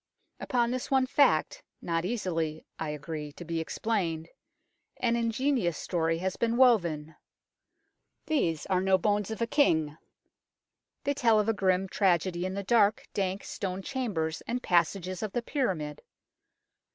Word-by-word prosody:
Upon 240 -1 0
this 255 0 -3
one 265 -1 +3
fact, 290 - +2 0.2
not 165 0 -1
easily, 165 -7 -2
I 160 - -2
agree, 150 0 -5
to 175 - -10
be 165 0 -2
explained, 165 -3 -2 0.7
an 235 -1 +1
ingenious 235 - 0
story 165 -2 0
has 185 +2 -2
been 235 0 +1
woven. 170 - +3 1.1
These 170 - 0
are 185 -1 +1
no 190 0 +4
bones 205 +2 0
of 220 +1 -2
a - - +2
king. 160 - +2 1.0
They 285 - +1
tell 230 -5 +3
of 210 - 0
a 225 - +3
grim 190 -1 +1
tragedy 185 -2 +1
in 185 - -5
the 200 - -3
dark, 210 0 +3
dank 195 0 -1
stone 190 -1 -4
chambers 190 - -2
and 245 +2 -2
passages 180 +1 +1
of 215 -3 -4
the 240 - -1
pyramid. 180 - -2
190 Hz, 145 wpm, -29 LUFS, 165-230 Hz, 1.1 s, no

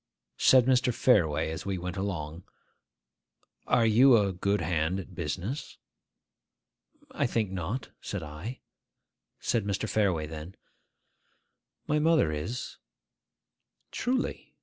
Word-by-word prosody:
Said 130 -2 +6
Mr. 125 -1 +3
Fareway, 85 - +2
as 80 - -5
we 100 -1 -2
went 90 0 -5
along, 90 -4 -4 1.2
'Are 115 - +4
you 120 +3 +6
a 100 -3 +1
good 100 +3 0
hand 80 +2 0
at 95 0 -9
business?' 90 - -4 1.3
'I 140 - 0
think 110 -5 -1
not,' 95 +7 -4
said 100 -5 -4
I. 80 +12 -7 0.8
Said 115 - 0
Mr. 100 +2 -2
Fareway 95 -8 +1
then, 80 +4 -8 1.3
'My 150 0 +1
mother 160 - +3
is.' 80 +12 -5 1.1
'Truly? 255 +1 -2
100 Hz, 110 wpm, -29 LUFS, 85-120 Hz, 1.3 s, Said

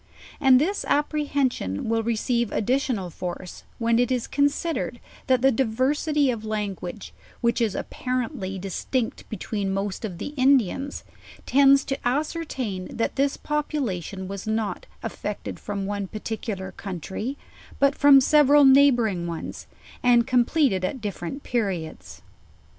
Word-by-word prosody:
And 265 -3 +6
this 385 +8 0
apprehension 285 - 0
will 225 0 +1
receive 235 0 0
additional 240 -6 0
force, 180 +1 -6 0.2
when 230 0 +2
it 245 +1 +2
is 250 -2 0
considered 285 -2 0 0.3
that 255 -1 +3
the 270 - +6
diversity 270 +4 +1
of 225 -3 -5
language, 210 -2 -4 0.3
which 235 +1 +1
is 220 -4 +1
appar 255 -1 -2
ently 190 -2 -6
distinct 220 +6 -3
between 205 -1 -3
most 195 +1 -3
of 190 -6 -4
the - - -5
Indians, 270 -1 +1 0.4
tends 275 +1 +5
to 270 - -2
ascer 305 +6 -1
tain 200 -10 -4
that 230 - -1
this 275 0 +1
population 225 - -3
was 195 +1 -6
not 220 -3 -2 0.2
effected 210 -1 -5
from 200 -1 -4
one 200 -1 -3
particu 215 0 -4
lar 190 0 -6
country, 195 - -5 0.4
but 280 0 +4
from 285 -1 +7
several 290 +1 +5
neighboring 240 -10 +5
ones, 170 -1 -6 0.3
and 240 -1 +4
comple 255 +5 +3
ted 190 -6 -1
at 255 +8 -2
different 210 +4 -5
periods. 195 -9 -3
235 Hz, 135 wpm, -25 LUFS, 200-275 Hz, 0.4 s, from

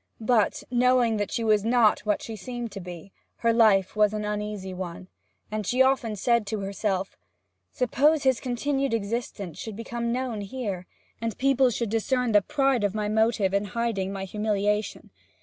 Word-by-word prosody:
But, 220 -1 +1
knowing 245 -2 +3
that 205 -1 -1
she 230 - -1
was 215 -2 +3
not 230 -1 +4
what 210 - +1
she 225 - -6
seemed 240 +2 -6
to 200 - -7
be, 180 0 -9 0.2
her 230 0 +1
life 210 -5 +4
was 210 0 +3
an 210 0 -3
uneasy 210 -2 -4
one, 180 0 -7 0.4
and 215 0 -2
she 250 +6 +3
often 260 -5 +1
said 235 +1 +1
to 210 0 -3
herself: 195 -1 -2 0.6
'Suppose 290 +5 +2
his 260 -3 +3
continued 270 +1 -1
existence 200 -5 -4
should 220 -2 -6
become 235 +1 -3
known 245 -3 -2
here, 200 -4 -5 0.3
and 230 -3 -3
people 270 -1 +3
should 230 -2 -2
discern 245 +2 0
the 205 -1 +5
pride 270 +1 +1
of 205 0 0
my 210 -1 -1
motive 220 -3 +2
in 200 +1 +1
hiding 200 -2 -2
my 195 -1 -4
humiliation? 210 +1 -1
220 Hz, 170 wpm, -26 LUFS, 200-240 Hz, 0.6 s, the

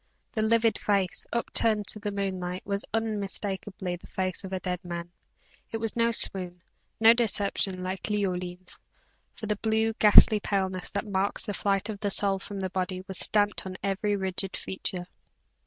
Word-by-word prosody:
The 220 - -2
livid 225 +1 +2
face, 195 -3 0
up 235 - -2
turned 215 -2 +4
to 215 - +1
the 205 0 -3
moonlight, 185 -2 -3
was 200 0 -1
unmistakably 200 -4 -3
the - - -16
face 185 -1 -2
of 190 - -7
a 190 - -2
dead 180 0 -4
man 175 -1 -6 0.6
it 225 - -2
was 225 -1 -3
no 235 0 +2
swoon, 180 -5 +2 0.4
no 225 +1 +8
deception, 200 -5 0
like 185 +3 -4
Leoline's; 180 -3 -3 0.6
for 225 - -7
the 210 -1 -1
blue, 220 +1 +1
ghastly 210 0 +8
paleness 190 -3 -2
that 200 +2 -3
marks 200 +1 -1
the 205 - -3
flight 200 0 0
of 215 -3 -5
the 205 - -1
soul 195 -1 +3
from 195 0 -7
the 185 -1 -3
body 185 0 -3
was 190 - 0
stamped 205 -1 +3
on 185 0 -7
every 200 +1 0
rigid 190 0 -3
feature. 185 -1 -5
195 Hz, 170 wpm, -27 LUFS, 185-210 Hz, 0.6 s, no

